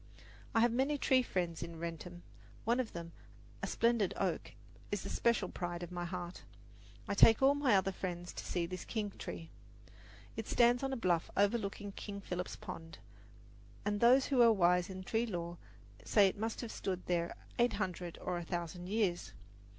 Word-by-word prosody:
I 225 - +5
have 240 0 +5
many 270 +5 +1
tree 260 -2 +4
friends 175 -8 -2
in 170 -1 -6
Wrentham. 170 +1 -6 0.4
One 235 +3 +2
of 250 -4 -2
them, 170 -1 -6 0.5
a - - -1
splendid 230 -5 +2
oak, 180 -5 -1 0.4
is 205 -2 -1
the - - -5
special 235 -5 +2
pride 175 -1 -4
of 175 - -7
my 175 -1 -3
heart. 175 0 -5 0.7
I - - 0
take 225 +2 +7
all 275 +1 +7
my 285 -6 +3
other 190 0 +3
friends 175 -2 -5
to - - -6
see 175 -1 -1
this 185 +1 -5
king 210 -3 -3
tree. 165 - -6 0.8
It 225 - -4
stands 240 0 +4
on 270 0 -1
a 265 - -1
bluff 175 -7 +1
overlooking 205 -1 +1
King 200 0 -6
Philip's 180 -2 -4
Pond, 165 0 -8 0.9
and 205 0 0
those 250 +4 +6
who 265 -3 +3
are 230 -1 +8
wise 180 -3 +3
in 185 0 -6
tree 225 +4 0
lore 175 -3 -4 0.4
say 205 -2 +5
it 190 - -1
must 225 +2 -3
have 235 -3 -5
stood 185 -2 -3
there 170 -1 0 0.2
eight 240 -1 +4
hundred 180 -4 -3
or 180 -1 -1
a - - -5
thousand 175 +1 -4
years. 200 -5 0
190 Hz, 180 wpm, -35 LUFS, 175-225 Hz, 0.9 s, are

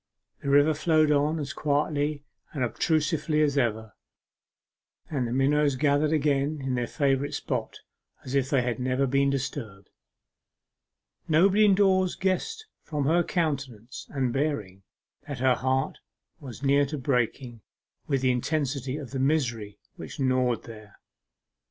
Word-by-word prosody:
The 140 - -3
river 145 +2 +5
flowed 155 0 +2
on 150 +2 +2
as 145 -3 -4
quietly 145 0 -1 0.3
and 140 -5 -1
obtusely 155 - +1
as 145 -2 +1
ever, 110 -5 -1 1.2
and 130 -5 -1
the - - -5
minnows 140 +2 +2
gathered 145 +2 +2
again 150 -1 +1
in 135 -1 -3
their 120 -1 -1
favourite 140 0 0
spot - - -4 0.4
as 130 - -6
if 135 -1 +1
they 135 -5 +2
had 120 -1 -2
never 130 +2 0
been 140 +1 +2
disturbed. 120 -7 -5 1.4
Nobody 190 +7 +4
indoors 190 -2 +3
guessed 440 - -2 0.2
from 150 -3 -3
her 165 +4 +3
countenance 135 - -3
and 130 -4 -1
bearing 110 -10 -2 0.5
that 145 -3 -5
her 130 0 +3
heart 130 +1 -1 0.4
was 135 -3 -10
near 140 +1 +3
to 150 +2 -4
breaking 125 -2 -1 0.5
with 135 -3 0
the 130 -1 +3
intensity 135 0 -2
of 140 -6 -8
the 135 - -3
misery 120 -8 0 0.2
which - - -9
gnawed 130 -2 +1
there. 110 -2 -12
140 Hz, 140 wpm, -27 LUFS, 125-150 Hz, 1.4 s, river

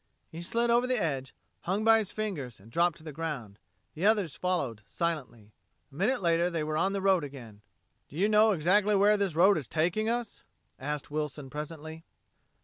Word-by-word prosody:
He 165 - -7
slid 235 +7 0
over 240 +1 +3
the 255 -2 +1
edge, 135 -7 -2 0.2
hung 195 +4 -2
by 225 0 +6
his 210 -2 -3
fingers 155 - -4
and 110 +4 -17
dropped 170 +3 +2
to - - -15
the 155 - -7
ground. 135 -10 -5 0.3
The 160 - -6
others 205 -7 +2
followed, 140 - -2
silently. 125 - -4 0.4
A - - -17
minute 215 - 0
later 170 +1 +2
they 165 -3 -2
were 155 0 -2
on 190 +5 +1
the 195 -1 -2
road 190 -4 +3
again. 120 -7 -10 0.5
"Do - - -13
you 190 +6 +2
know 215 +1 +5
exactly 200 +4 +3
where 205 +2 +5
this 200 -5 -1
road 185 +2 +5
is 135 - -8
taking 180 +8 0
us?" 235 -2 -3 0.4
asked 145 +1 -4
Wilson 150 -2 -4
presently. 155 +2 -7
170 Hz, 190 wpm, -29 LUFS, 150-205 Hz, 0.5 s, by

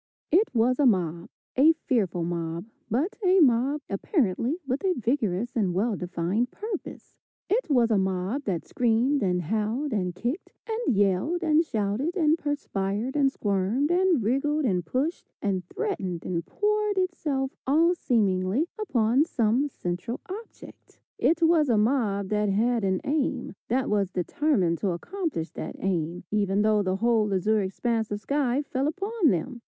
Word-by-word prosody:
It 390 +7 +4
was 245 +3 +2
a 285 - +5
mob, 175 -5 0 0.3
a 300 +5 +6
fearful 200 - -1
mob, 170 0 -3 0.2
but 280 - 0
a 375 +1 +5
mob 270 0 +3
apparently 255 - 0
with 270 +4 -2
a 375 -2 +2
vigorous 230 - -1
and 195 -6 0
well 215 +3 +1
defined 185 +6 -1
purpose. 420 - -7 0.3
It 460 -3 +1
was 240 -5 +3
a 210 - +4
mob 190 +8 -1
that 180 -5 -2
screamed 250 +4 +1
and 180 -2 0
howled, 220 - -1
and 180 -4 -1
kicked, 245 - -4
and 450 - 0
yelled, 205 - +1
and 315 0 +4
shouted, 235 - -2
and 315 -3 +4
perspired, 245 -6 -2
and 275 -2 +3
squirmed, 210 - 0
and 355 - +3
wriggled, 285 +6 +1
and 185 -6 +1
pushed, 270 - -2
and 190 -3 -1
threatened, 190 - -3
and 170 -2 -3
poured 420 -1 0
itself 300 -8 -1 0.2
all 325 +6 +4
seemingly 205 - +1
upon 250 - +2
some 245 -2 +1
central 180 +2 -4
object. 425 +5 -11 0.2
It 335 +1 +2
was 325 -3 +4
a 230 - +3
mob 210 -4 +1
that 210 -1 +1
had 230 +3 +1
an 190 -1 0
aim, 275 -3 -1
that 255 +2 0
was 200 -3 +1
determined 185 - 0
to 195 -4 0
accomplish 320 - -4
that - - -6
aim, 175 -2 -2
even 205 -1 +1
though 215 -1 +3
the 185 -1 0
whole 220 -1 +2
azure 210 +3 +2
expanse 220 +3 -1
of 205 - -3
sky 275 +4 0
fell 270 0 -1
upon 390 +2 +1
them. 190 +6 -2
235 Hz, 155 wpm, -26 LUFS, 195-295 Hz, 0.3 s, a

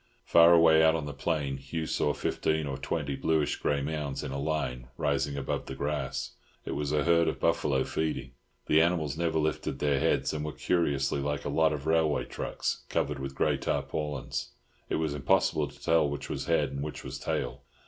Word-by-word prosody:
Far 85 0 +7
away 80 -2 +7
out 80 0 +5
on 80 -3 -2
the 70 - -5
plain 70 -2 -1
Hugh 80 +4 -4
saw 75 - +1
fifteen 80 +1 -1
or 70 -1 -3
twenty 70 0 -2
bluish 80 +1 +1
grey 70 -1 0
mounds 75 -2 -3
in 70 - -4
a 70 - -3
line 70 -5 -2
rising 70 -1 0
above 70 - -3
the 65 - -5
grass; 70 -2 -2 0.3
it - - -4
was 75 0 -2
a 75 - +2
herd 85 -1 +4
of 80 - -1
buffalo 65 -1 +2
feeding. 70 -5 -2 0.3
The 80 - +5
animals 80 -4 +1
never 80 -1 0
lifted 75 0 -1
their 70 -2 +1
heads, - - +1
and 75 -1 -3
were 75 -1 -4
curiously 70 -5 0
like 70 0 -2
a - - -1
lot 80 +2 +3
of 75 -1 -4
railway 80 -2 +2
trucks - - -3
covered - - -1
with 70 0 -5
grey - - +2
tarpaulin. 75 -2 -3 0.6
It - - 0
was 80 -2 0
impossible 70 -2 +2
to - - -15
tell 80 -3 +3
which 70 0 -5
was - - -3
head 75 -5 +1
and 70 0 -4
which 75 +1 -5
was - - -6
tail. - - -3
75 Hz, 200 wpm, -29 LUFS, 70-80 Hz, 0.6 s, Far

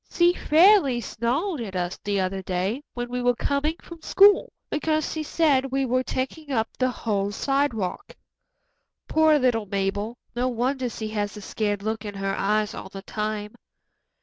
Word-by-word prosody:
"She 345 0 +4
fairly 325 - +5
snarled 255 - -2
at 200 -5 -6
us 180 0 -2
the 200 -1 0
other 190 +1 -1
day, 190 +7 -2
when 245 0 -3
we 250 +1 -3
were 245 0 +2
coming 285 +5 0
from 335 -2 -11
school, 400 +4 +5 0.2
because 310 0 0
she 315 - -3
said 295 -4 +2
we 270 0 +1
were 255 +1 +1
taking 270 +4 -4
up 225 -4 -1
the 255 0 +1
whole 205 -5 -1
sidewalk. 270 - -1 0.9
Poor 315 -1 +4
little 240 -6 +1
Mabel, 200 +4 -2 0.2
no 245 +1 +1
wonder 255 +1 -1
she 220 -1 -5
has 205 -1 -3
a - - -8
scared 205 -1 -2
look 220 0 -2
in 205 -1 -6
her 195 0 -2
eyes 210 +1 0
all - - -8
the 195 0 -9
time." 210 -1 -4
240 Hz, 170 wpm, -25 LUFS, 205-280 Hz, 0.9 s, fairly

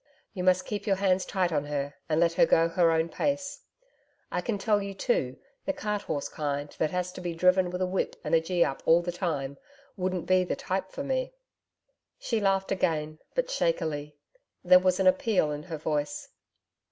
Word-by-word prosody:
You 185 -4 -4
must 185 0 +3
keep 205 -1 -4
your 195 - +3
hands 190 -1 +1
tight 185 -2 0
on 145 -2 0
her 145 -1 -3 0.2
and 155 0 +2
let 170 0 +3
her - - +4
go 165 0 +4
her 170 0 +3
own 160 0 +2
pace. 280 - -2 0.7
I - - -1
can 230 -4 -2
tell 205 +1 +2
you, 200 0 -5
too, 135 - 0 0.3
the 290 - 0
cart 210 -4 -2
horse 145 - -3
kind 145 -1 -4
that 155 - +2
has 180 +1 -2
to 180 - -9
be 175 -2 -3
driven 180 +1 +3
with 180 +1 -2
a - - +2
whip 185 +1 -1
and 155 0 -3
a 165 - +5
"gee 175 +1 +2
up" 135 - -4
all 170 +1 +6
the 175 - -2
time 145 -6 -3 0.4
wouldn't 185 -2 -2
be 185 0 +4
the 180 - -2
type 190 0 -3
for - - -5
me.' - - -2 0.8
She 230 - -1
laughed 195 -1 +1
gain, 155 -1 -1 0.2
but - - 0
shakily. 155 - -1 0.5
There 180 0 +7
was 185 0 +1
an - - +2
appeal 235 - +3
in 145 0 -4
her 160 0 -6
voice. 150 -1 -2
180 Hz, 200 wpm, -28 LUFS, 155-195 Hz, 0.8 s, There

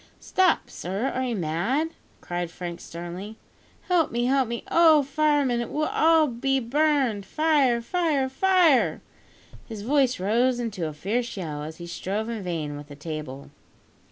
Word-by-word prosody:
"Stop, 375 -2 +2
sir, 195 +9 -3
are 260 - -2
you 240 -2 -2
mad?" 200 - -1 0.3
cried 175 -1 -3
Frank 175 0 -7
sternly. 175 +6 -8 0.5
"Help 355 -4 +2
me! 240 +1 0
help 265 0 +2
me! 235 0 -4
Oh! 320 -3 +6
fireman, 280 -3 +1
it 235 - -5
will 315 +1 +3
be 270 +1 0
all - - -1
burned. 275 -6 +1
Fire! 285 -3 +2
fire! 310 -3 0
fire!!!" 340 0 +3 0.7
His 220 -3 -7
voice 265 -1 +2
rose 240 +6 +2
into 205 -8 -3
a 155 - -6
fierce 220 +9 -2
yell, 155 -5 -4
as 155 +2 -7
he 170 - -8
strove 200 +6 -3
in 230 -2 -4
vain 160 -5 -4
with 145 0 -10
the 145 - -11
table. 150 -3 -7
235 Hz, 155 wpm, -25 LUFS, 175-285 Hz, 0.7 s, Oh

